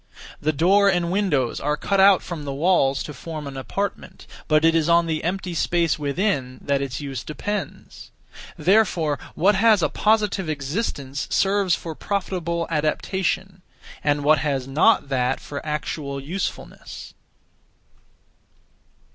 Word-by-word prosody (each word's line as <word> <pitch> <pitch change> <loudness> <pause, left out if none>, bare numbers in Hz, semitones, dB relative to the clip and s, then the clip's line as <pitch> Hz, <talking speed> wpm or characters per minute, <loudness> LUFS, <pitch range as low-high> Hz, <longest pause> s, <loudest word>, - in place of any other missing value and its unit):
The 155 - +1
door 190 +7 +4
and 175 -2 0
windows 165 - 0
are 150 +1 -1
cut 195 +4 0
out 195 0 +6
(from 165 -4 -6
the 140 -1 -4
walls) 140 -4 +2
to 150 - -7
form 155 +2 -7
an 140 -1 -7
apartment; 195 +9 -5 0.2
but 155 +1 +3
it 165 - +5
is 165 0 +1
on 170 0 +5
the 160 -1 -2
empty 180 +1 -2
space 170 -1 +1
(within), 140 -4 -1
that 140 -1 0
its 135 0 -4
use 135 -4 -5
depends. 205 +8 -6 0.5
Therefore, 170 -4 +2 0.2
what 195 +5 +4
has 210 -2 +4
a - - +2
(positive) 210 -5 +1
existence 140 - -3
serves 195 -2 +2
for 165 - -7
profitable 170 -3 -2
adaptation, 180 +4 -1 0.4
and 145 -1 +1
what 155 +1 +4
has 135 -4 -2
not 145 +3 +3
that 130 -1 0
for 140 -1 -7
(actual) 150 -2 -4
usefulness. 175 +8 -6
160 Hz, 140 wpm, -23 LUFS, 145-190 Hz, 0.5 s, out